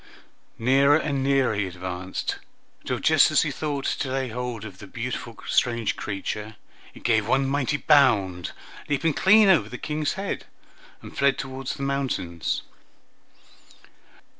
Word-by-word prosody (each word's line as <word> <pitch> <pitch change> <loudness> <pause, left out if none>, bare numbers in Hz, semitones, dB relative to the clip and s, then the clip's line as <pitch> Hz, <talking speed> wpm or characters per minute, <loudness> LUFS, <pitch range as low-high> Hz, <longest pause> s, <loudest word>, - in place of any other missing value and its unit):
Nearer 135 +5 +4
and 140 -4 -1
nearer 135 -3 +2
he 100 -2 -1
advanced, 90 0 -4 0.5
till - - -1
just - - +5
as - - +3
he - - -2
thought 145 -3 -3
to 135 - -1
lay 135 -1 -1
hold 120 -2 -5
of 95 -3 -10
the 105 - -10
beautiful 120 0 -5
strange 115 -2 +1
creature, 105 +2 -5 0.4
it - - -14
gave 110 -3 +2
one 135 +2 +2
mighty 140 +1 0
bound, 105 - +3 0.4
leaped 150 +2 +1
clean 210 +2 +6
over 190 -4 +4
the - - -6
King's 150 -1 -2
head, 195 +1 -4 0.6
and - - -11
fled 140 0 +3
toward 135 0 -6
the 140 - -3
mountains. 130 - -2
130 Hz, 140 wpm, -25 LUFS, 105-140 Hz, 0.6 s, clean